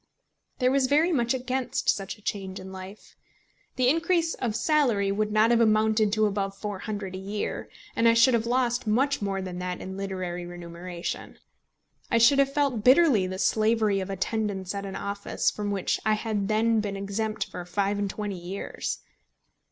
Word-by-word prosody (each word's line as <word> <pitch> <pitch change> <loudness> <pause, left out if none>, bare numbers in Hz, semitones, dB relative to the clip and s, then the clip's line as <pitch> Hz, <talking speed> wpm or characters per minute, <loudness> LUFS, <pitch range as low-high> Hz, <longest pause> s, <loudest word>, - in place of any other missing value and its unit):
There 250 -1 +2
was 270 -1 +3
very 305 +6 +3
much 240 -5 +1
against 255 0 -2
such 195 +1 0
a 210 - -22
change 190 -2 -4
in 190 0 -9
life. 190 +2 -10 0.6
The 255 -1 +2
increase 330 +3 +2
of 230 -4 -3
salary 235 -7 +2
would 210 +1 0
not 215 +2 +4
have 235 -1 +4
amounted 215 -1 +3
to 215 -1 +3
above 195 -1 -2
£400 205 -1 -4
a 185 - -5
year, 200 +2 -4 0.3
and 230 - +3
I 230 - +5
should 230 +2 +6
have 230 0 +1
lost 245 -1 +1
much 265 +6 +2
more 195 -1 -2
than 180 -1 -5
that 180 0 -3
in 190 0 -7
literary 185 -3 -4
remuneration. 175 0 -6 0.7
I 230 - +3
should 265 +5 +6
have 275 0 +3
felt 275 -6 0
bitterly 255 - +5
the 185 0 -5
slavery 215 0 +2
of 190 0 -4
attendance 195 -1 -2
at 200 0 -4
an 195 - -6
office, 200 0 -1
from 205 -1 -4
which 200 -2 0
I 215 - +3
had 215 -2 -1
then 220 +1 +2
been 205 -2 -3
exempt 215 +2 -2
for 180 - -7
five 200 +3 -1
and 200 -1 -1
twenty 205 -2 -4
years. 180 +3 -5
210 Hz, 180 wpm, -27 LUFS, 195-235 Hz, 0.7 s, should